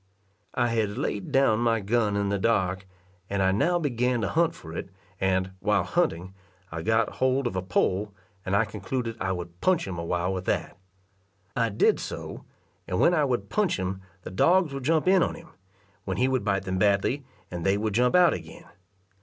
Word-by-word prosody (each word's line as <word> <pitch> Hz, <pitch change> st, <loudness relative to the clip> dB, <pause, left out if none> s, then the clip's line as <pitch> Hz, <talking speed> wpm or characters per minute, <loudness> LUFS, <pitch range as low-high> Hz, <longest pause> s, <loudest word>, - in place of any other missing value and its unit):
I 120 Hz, -1 st, +2 dB
had 110 Hz, -3 st, -1 dB
laid 100 Hz, -2 st, -3 dB
down 135 Hz, -5 st, +3 dB
my 115 Hz, -1 st, +2 dB
gun 105 Hz, 0 st, +1 dB
in 100 Hz, -1 st, 0 dB
the 100 Hz, 0 st, 0 dB
dark, 95 Hz, -3 st, 0 dB, 0.4 s
and 100 Hz, -1 st, 0 dB
I 95 Hz, -, +3 dB
now 170 Hz, -, +2 dB
began 125 Hz, -5 st, 0 dB
to 105 Hz, -, -1 dB
hunt 165 Hz, 0 st, +2 dB
for 80 Hz, -1 st, -10 dB
it; 95 Hz, -, -5 dB, 0.3 s
and, 95 Hz, 0 st, +1 dB
while 105 Hz, +2 st, +2 dB
hunting, 95 Hz, -, -1 dB, 0.4 s
I 80 Hz, 0 st, -4 dB
got 110 Hz, +3 st, +1 dB
hold 130 Hz, +1 st, +2 dB
of 120 Hz, -, -2 dB
a 95 Hz, -, 0 dB
pole, 95 Hz, +2 st, 0 dB, 0.3 s
and 95 Hz, 0 st, -1 dB
I 115 Hz, +3 st, +3 dB
concluded 115 Hz, +3 st, -4 dB
I 95 Hz, -, 0 dB
would 90 Hz, -1 st, -6 dB
punch 185 Hz, -3 st, +2 dB
him 90 Hz, -3 st, -5 dB
awhile 85 Hz, +2 st, -1 dB
with 95 Hz, -1 st, -4 dB
that. -, -, -1 dB, 0.8 s
I 115 Hz, -1 st, +1 dB
did 105 Hz, -, +3 dB
so, -, -, -6 dB, 0.4 s
and 90 Hz, 0 st, -1 dB
when 175 Hz, -, +5 dB
I 155 Hz, -4 st, +3 dB
would 120 Hz, -7 st, -2 dB
punch 210 Hz, -4 st, +1 dB
him, 95 Hz, 0 st, -3 dB, 0.2 s
the -, -, -7 dB
dogs 170 Hz, -, +3 dB
would 135 Hz, -2 st, -5 dB
jump 160 Hz, +2 st, +2 dB
in 190 Hz, -1 st, +5 dB
on -, -, 0 dB
him, -, -, -13 dB, 0.6 s
when 95 Hz, -, -2 dB
he 125 Hz, -, +3 dB
would 130 Hz, -4 st, 0 dB
bite 100 Hz, -2 st, 0 dB
them 95 Hz, -1 st, -2 dB
badly, 100 Hz, +8 st, +2 dB, 0.3 s
and 85 Hz, -2 st, -4 dB
they 95 Hz, +3 st, +2 dB
would 105 Hz, 0 st, -1 dB
jump 125 Hz, -, +3 dB
out 180 Hz, -2 st, +6 dB
again. -, -, -8 dB
105 Hz, 200 wpm, -26 LUFS, 95-130 Hz, 0.8 s, out